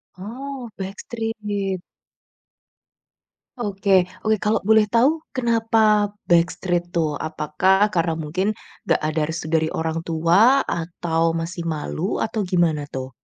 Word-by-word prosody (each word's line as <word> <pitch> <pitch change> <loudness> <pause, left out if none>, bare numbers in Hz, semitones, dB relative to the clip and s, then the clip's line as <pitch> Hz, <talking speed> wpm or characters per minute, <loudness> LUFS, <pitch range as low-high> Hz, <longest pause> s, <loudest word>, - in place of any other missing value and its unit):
Oh, 250 +6 -7
backstreet. 205 -1 -4 1.8
Oke 195 -4 +2 0.2
oke. 220 0 +2
Kalau 210 +2 0
boleh 220 +1 +4
tahu 235 +9 +3 0.2
kenapa 225 -4 +2 0.2
backstreet 175 0 +1
tuh? 155 -4 0
Apakah 165 +6 +1
karena 170 -4 0
mungkin 165 +6 -1 0.3
enggak - - +2
ada 155 +1 -1
restu 160 0 -5
dari 160 0 +2
orang 160 +1 -2
tua? 175 +12 +4
Atau 165 0 -1
masih 165 +1 -4
malu? 160 +3 -2
Atau 220 -2 -1
gimana 170 -5 +1
tuh? 130 -2 -6
185 Hz, 115 wpm, -22 LUFS, 165-215 Hz, 1.8 s, boleh